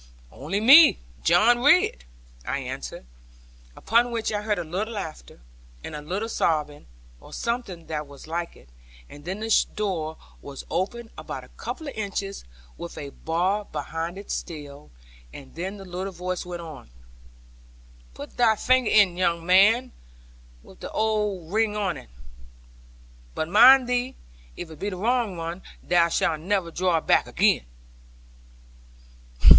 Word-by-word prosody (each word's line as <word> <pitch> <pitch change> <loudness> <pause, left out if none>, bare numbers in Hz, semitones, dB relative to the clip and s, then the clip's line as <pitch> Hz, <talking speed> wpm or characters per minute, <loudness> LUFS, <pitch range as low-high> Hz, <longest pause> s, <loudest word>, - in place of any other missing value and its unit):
'Only 165 +9 -3
me, 275 +9 +8 0.3
John 240 - +5
Ridd,' 290 - +4 0.4
I - - -2
answered; - - -6 0.7
upon 235 +3 +2
which 230 -2 -2
I 210 -1 -1
heard 210 0 -1
a 175 - -2
little 200 +8 -4
laughter, 155 - -7 0.4
and - - -6
a 150 - -6
little 190 +9 -3
sobbing, 150 -8 -1 0.3
or - - -15
something 235 -8 -4
that 150 -2 -4
was 140 -1 -13
like 170 +2 -4
it; - - -19 0.4
and 145 +1 -13
then 190 +4 -4
the 225 0 +3
door 170 -7 -2 0.2
was 140 -1 -9
opened 225 +5 -2
about - - -6
a - - -16
couple 315 - -7
of 280 - -5
inches, 200 -2 -4 0.4
with 170 - -7
a 140 -1 -6
bar 185 +8 -1
behind 165 +3 -5
it 200 - -8
still; 145 -3 -6 0.4
and 130 - -12
then 190 +5 -5
the 195 - -10
little 185 +2 -5
voice 180 0 -4
went 175 -1 -6
on, 155 - -10 1.3
'Put - - -10
thy 230 -3 +4
finger 255 +1 +2
in, 195 -5 +4
young 170 -2 0
man, 215 +8 +5 0.7
with - - -17
the - - -7
old 210 -5 -1
ring 220 -1 +2
on 195 -4 -1
it. - - -13 1.3
But 160 - -2
mind 250 +6 +8
thee, 250 +1 -1 0.4
if 170 -2 -7
it 155 - -12
be 200 - -2
the 185 - -6
wrong 225 -2 0
one, 165 +2 -5 0.2
thou 170 -1 +3
shalt 160 -1 +1
never 180 0 -1
draw 180 0 +1
it 160 - -4
back - - +3
again.' - - +2
185 Hz, 150 wpm, -25 LUFS, 165-220 Hz, 1.3 s, me